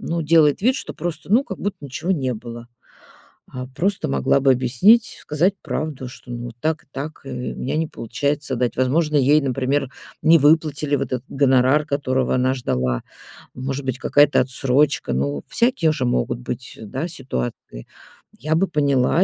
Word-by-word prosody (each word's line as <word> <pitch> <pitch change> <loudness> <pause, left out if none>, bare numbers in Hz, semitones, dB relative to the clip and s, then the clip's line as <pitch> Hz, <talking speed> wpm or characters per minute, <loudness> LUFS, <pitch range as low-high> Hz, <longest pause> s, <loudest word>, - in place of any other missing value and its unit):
ну, 165 0 -2
делает 155 +1 +4
вид, 255 +3 +3
что - - -6
просто, 175 +3 -5
ну, 250 +5 +5
как 190 - -7
будто 205 0 -3
ничего 145 +7 -2
не 130 -6 -1
было. 120 +1 -9 0.9
Э, 125 0 -5
просто 195 - -1
могла 70 - +2
бы 135 0 +5
объяснить, 130 - +3
сказать 170 +6 +1
правду, 150 -4 -4
что, 125 - -13
ну, 120 0 -5
так 155 -1 -1
и - - -41
так, 145 +4 -6
и - - -6 0.2
у - - -13
меня 135 - -3
не 160 - 0
получается 140 +4 -2
отдать. 125 0 -1
Возможно, 150 +4 +1
ей, 145 +3 +5
например, 135 +1 0 0.3
не 165 +1 +6
выплатили 150 -1 +2
вот - - -2
этот 125 0 -2
гонорар, 135 +2 +3
которого 130 -3 0
она 130 +1 +2
ждала, 65 - -1 0.5
может 135 +2 -4
быть, 130 0 -2
какая-то 145 +1 +4
отсрочка, 135 +3 +1
ну, 70 +2 -2
всякие 235 - +2
же 135 -4 -2
могут 120 0 -1
быть, 125 0 -6
да, 130 - -4
ситуации. 65 - -5 0.5
Я 155 +5 -1
бы 190 +3 +2
поняла 145 +2 +2
140 Hz, 170 wpm, -21 LUFS, 125-155 Hz, 0.9 s, не